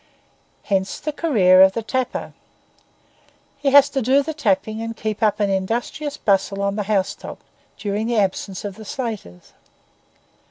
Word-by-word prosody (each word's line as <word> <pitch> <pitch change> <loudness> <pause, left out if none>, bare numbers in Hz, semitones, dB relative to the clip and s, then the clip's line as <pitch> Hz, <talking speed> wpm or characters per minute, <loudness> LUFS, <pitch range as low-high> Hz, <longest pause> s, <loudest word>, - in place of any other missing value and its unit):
Hence 190 -2 -1
the 305 - -3
career 205 - +4
of 190 0 +7
the 230 - -3
tapper. 255 +3 -3 1.3
He 280 -1 +1
has 280 0 +7
to 270 - -1
do 265 +4 +3
the 315 +2 -4
tapping 220 -5 0
and 230 0 -5
keep 215 0 -4
up 215 -2 +2
an 205 -1 +1
industrious 235 +9 -2
bustle 195 0 +1
on 200 0 0
the 210 - -1
housetop 195 -3 -2 0.4
during 210 +2 -2
the 235 -1 0
absence 195 -1 -1
of 200 -2 -6
the 220 - -9
slaters. 210 - -6
215 Hz, 155 wpm, -21 LUFS, 195-260 Hz, 1.3 s, of